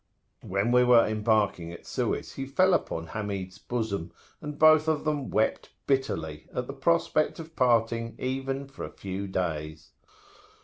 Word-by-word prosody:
When 100 +5 0
we 125 0 +6
were 120 -2 +6
embarking 105 -5 +1
at 85 - -11
Suez, - - -2
he 135 - -5
fell 185 +7 +3
upon 80 - -1
Hamid's 100 -1 -5
bosom, 110 -8 -3 0.3
and 150 0 -6
both 155 0 +6
of 155 -2 +1
them 150 -3 -1
wept 110 - 0 0.2
bitterly, 130 - -1
at 125 - -3
the 135 - -6
prospect 155 +2 +1
of 160 0 -9
parting 115 -2 +2
even 135 +1 -3
for 135 - -9
a - - -5
few 100 +1 -5
days. 80 -4 -3
115 Hz, 150 wpm, -28 LUFS, 100-135 Hz, 0.3 s, we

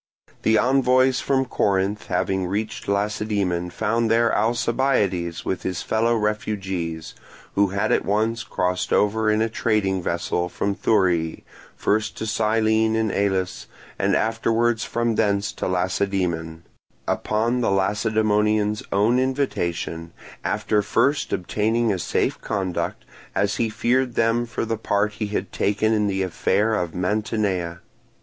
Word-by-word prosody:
The 110 0 +3
envoys 130 +1 +3
from 135 -1 +1
Corinth 100 -3 0
having 95 -1 0
reached 105 +4 -3
Lacedaemon 100 -3 -1
found 110 +5 0
there 115 +1 +3
Alcibiades 110 -6 0
with 95 - -2
his 90 -2 -3
fellow 115 +2 +1
refugees, 95 -7 -2 0.4
who 100 0 +3
had 100 +3 -1
at - - +2
once 110 +3 0
crossed 90 0 -2
over 110 +1 +2
in 110 +1 +2
a - - +1
trading 105 -4 0
vessel 85 +1 -1
from 100 +3 -1
Thurii, 90 -6 +1 0.3
first 110 +1 0
to - - -4
Cyllene 110 0 +2
in 110 -2 +1
Elis, 95 -2 -1 0.3
and - - +2
afterwards 115 +1 +1
from 120 0 0
thence 100 -2 +1
to - - -4
Lacedaemon; 90 -3 -1 0.4
upon 115 +3 0
the - - +1
Lacedaemonians' 105 +1 +1
own 105 +6 +3
invitation, 85 -11 -2 0.3
after 105 -1 +1
first 140 +7 +1
obtaining 110 +4 0
a 95 - -3
safe - - -1
conduct, 95 -4 -3 0.3
as 100 0 +1
he 115 - +1
feared 125 +2 0
them 115 +1 +2
for 115 - -3
the 115 0 -2
part 105 -1 0
he 105 0 -4
had 100 -1 -3
taken 110 +2 +1
in 105 -1 +2
the 95 -1 0
affair 100 +4 +1
of 90 -6 -2
Mantinea. 95 -3 -1
105 Hz, 135 wpm, -23 LUFS, 95-115 Hz, 0.4 s, The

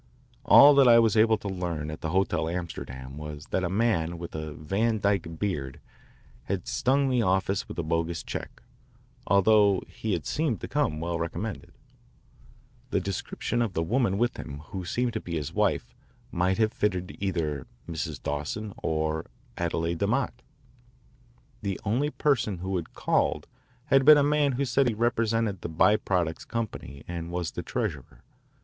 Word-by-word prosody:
All 145 +1 +9
that 140 -2 +6
I 120 -1 +8
was 115 -1 +4
able 110 0 +5
to 105 - -7
learn 85 -5 -3
at 75 - -8
the 80 - -2
Hotel 95 -2 +1
Amsterdam 70 -6 -6
was 75 0 -7
that 95 - 0
a 85 - 0
man 90 -5 +1
with 85 0 -7
a 80 -1 -5
Van 110 +9 0
Dyke 95 -5 0
beard 70 -11 -3 0.7
had - - -3
stung 135 +2 +2
the 125 -2 +2
office 95 -1 +1
with - - -8
a 85 - -1
bogus 85 +1 -1
check, - - -7 0.6
although 100 0 +4
he 110 -2 -4
had 80 -6 -2
seemed 140 - -1
to - - -4
come 75 - 0
well 85 +1 -2
recommended. 85 +6 -4 1.2
The - - +1
description 120 - -3
of 110 -5 -1
the 80 - 0
woman 105 +1 +1
with 120 +3 0
him 70 -1 -7
who 95 -2 -4
seemed 120 +6 -1
to 110 - -1
be 85 - -5
his 75 -4 -3
wife - - 0 0.4
might 90 +2 +1
have 110 -1 +2
fitted 90 -4 -1
either 80 -8 -2 0.2
Mrs. 80 -4 -4
Dawson 75 +9 -3
or 80 0 -1 0.3
Adele 85 -1 -1
DeMott. 85 - 0 1.3
The 100 -3 -3
only 125 +8 +1
person 130 -10 +1
who 95 +2 -3
had 85 - -7
called - - +1 0.4
had 135 0 +4
been 150 +2 +9
a 145 - +4
man 145 -1 +2
who 140 +3 0
said 135 +1 +2
he 115 - 0
represented 115 -3 0
the - - -4
By 90 +6 +4
Products 90 -6 -1
Company 105 - -5
and 85 -1 -5
was 85 -1 -3
the - - -5
treasurer. - - -4
95 Hz, 170 wpm, -27 LUFS, 80-115 Hz, 1.3 s, All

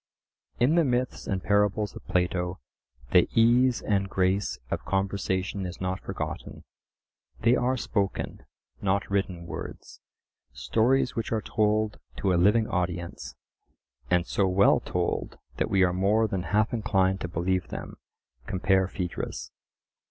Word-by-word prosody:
In 125 +6 +4
the 170 0 +4
myths 125 -2 -1
and 95 -1 -2
parables 105 0 +1
of - - -11
Plato 90 0 0 0.5
the - - +5
ease 120 +2 +4
and 100 -2 0
grace 95 +1 +1
of - - -2
conversation 95 0 -1
is 90 - -8
not 95 0 -2
forgotten: - - -6 0.8
they 120 +2 +5
are 130 +1 +1
spoken, 100 -5 -2 0.4
not 100 0 +1
written 95 -3 -1
words, 85 - -8 0.5
stories 115 - +1
which 115 - -3
are 110 - +1
told 110 -1 +1 0.2
to 95 -2 +1
a 85 - +3
living 110 +4 +4
audience, 85 -8 -3 0.7
and 90 -1 +3
so 100 +1 +1
well 95 +2 +4
told - - -2 0.2
that - - 0
we 95 -3 +4
are 90 -1 +2
more 105 +5 +2
than 95 -3 -3
half 110 +3 +2
inclined 95 -4 +1
to - - -2
believe 90 +2 -1
them - - -7 0.5
(compare 95 0 +2
Phaedrus). 90 -2 -5
95 Hz, 135 wpm, -27 LUFS, 90-110 Hz, 0.8 s, the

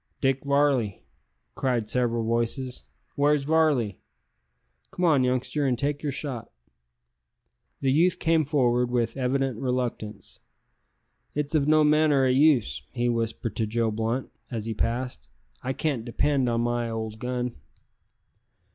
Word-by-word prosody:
"Dick 135 -1 +1
Varley," 140 -7 +1 0.5
cried 125 -5 -1
several 120 -1 +1
voices; 115 - -2 0.3
"where's 145 0 +3
Varley? 145 - +2 0.9
Come 180 - -1
on, 150 -6 +4
youngster, 130 +3 0
an' 125 - +2
take 145 +3 -2
yer 150 - -2
shot." 130 -4 -4 1.3
The 135 - +2
youth 170 +6 +3
came 165 -1 +2
forward 125 -4 +2
with 120 -2 0
evident 135 -2 0
reluctance. 125 -4 -3 1.0
"It's 150 +1 -2
of 150 -2 +2
no 155 0 +5
manner 150 -2 +4
o' - - +3
use," 135 -3 +3
he 120 -1 0
whispered 115 -2 -2
to 110 - 0
Joe 115 +1 0
Blunt 115 +4 -2 0.2
as 115 -4 -4
he 115 - -2
passed, 115 - -3 0.3
"I 130 - -2
can't 135 -4 -1
depend 135 +2 +1
on 115 0 +1
my 120 0 -1
old 110 -1 -4
gun." 125 - -3
125 Hz, 135 wpm, -26 LUFS, 115-140 Hz, 1.3 s, no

